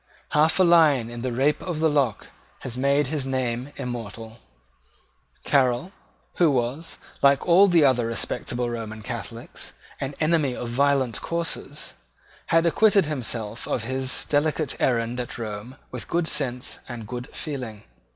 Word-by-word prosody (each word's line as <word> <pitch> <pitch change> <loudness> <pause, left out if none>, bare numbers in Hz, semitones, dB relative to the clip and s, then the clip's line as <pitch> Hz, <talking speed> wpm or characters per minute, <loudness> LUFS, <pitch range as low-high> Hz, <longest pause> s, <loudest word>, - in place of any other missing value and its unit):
Half 155 +4 +3
a - - +7
line 155 -9 +5
in 120 0 -6
the 130 0 -2
Rape 135 +5 +1
of 175 -4 -3
the 160 - +4
Lock 140 -8 0 0.3
has 120 - -5
made 140 +3 +2
his 145 -3 -2
name 130 0 -2
immortal. 115 -2 -6 1.1
Caryl, 130 +4 +2 0.5
who 170 -3 +5
was, 135 +4 -1 0.2
like 140 -1 +4
all 185 +4 +7
the 170 -5 +5
other 125 -4 +3
respectable 120 +1 -2
Roman 110 -2 -5
Catholics, 115 0 -6 0.3
an 135 +1 -4
enemy 155 -5 +2
to - - -5
violent 130 -1 +1
courses, 170 0 -3 0.5
had 165 +1 +3
acquitted 200 +3 +4
himself 115 -6 -3
of 120 - -1
his 130 +2 -2
delicate 150 0 +1
errand 120 -1 +1
at 125 - -5
Rome 110 +2 -6 0.2
with 125 - -6
good 170 -1 0
sense 125 -5 -1
and 115 -3 -6
good 125 +1 -5
feeling. 125 -8 -5
130 Hz, 145 wpm, -25 LUFS, 120-150 Hz, 1.1 s, a